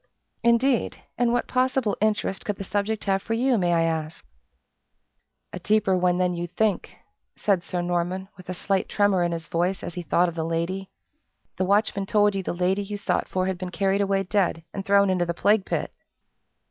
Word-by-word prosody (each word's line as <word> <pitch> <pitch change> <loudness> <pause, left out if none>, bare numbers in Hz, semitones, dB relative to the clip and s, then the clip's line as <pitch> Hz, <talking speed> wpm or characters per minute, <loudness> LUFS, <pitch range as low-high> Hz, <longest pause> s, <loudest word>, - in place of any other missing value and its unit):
"Indeed! 235 +2 +2 0.2
and 240 0 +2
what 245 - 0
possible 255 -3 +1
interest 210 -3 0
could 205 - -2
the 195 - -6
subject 205 +2 -2
have 195 -1 +1
for 225 - -2
you, 250 +2 +2
may 175 -1 +1
I 165 -1 +3
ask?" 160 -1 -3 1.3
"A 180 - -5
deeper 205 0 +2
one 180 -1 +2
than 180 -1 +1
you 175 0 -3
think!" 205 +3 -1 0.4
said 195 -4 +1
Sir 175 0 -3
Norman, 175 +2 -1
with 185 -1 -14
a 185 - -3
slight 195 +1 -1
tremor 205 -3 +2
in 175 0 +1
his 165 -1 -4
voice 175 +4 -1
as 175 - -5
he 180 - -4
thought 175 +1 +2
of 170 - -4
the 160 -1 -3
lady, 170 +4 -2 0.7
"the 190 - +1
watchman 200 0 +1
told 205 -1 +3
you 195 - -1
the - - -3
lady 180 +3 0
you 205 +1 -5
sought 200 - -1
for 185 0 0
had 190 -1 -2
been 185 -1 -4
carried 195 +1 +1
away 195 -1 +1
dead, 185 -4 0
and 195 - -4
thrown 200 -1 +4
into 175 -2 0
the 170 - -2
plague 205 +1 +2
pit!" - - -2
190 Hz, 200 wpm, -25 LUFS, 175-205 Hz, 1.3 s, thrown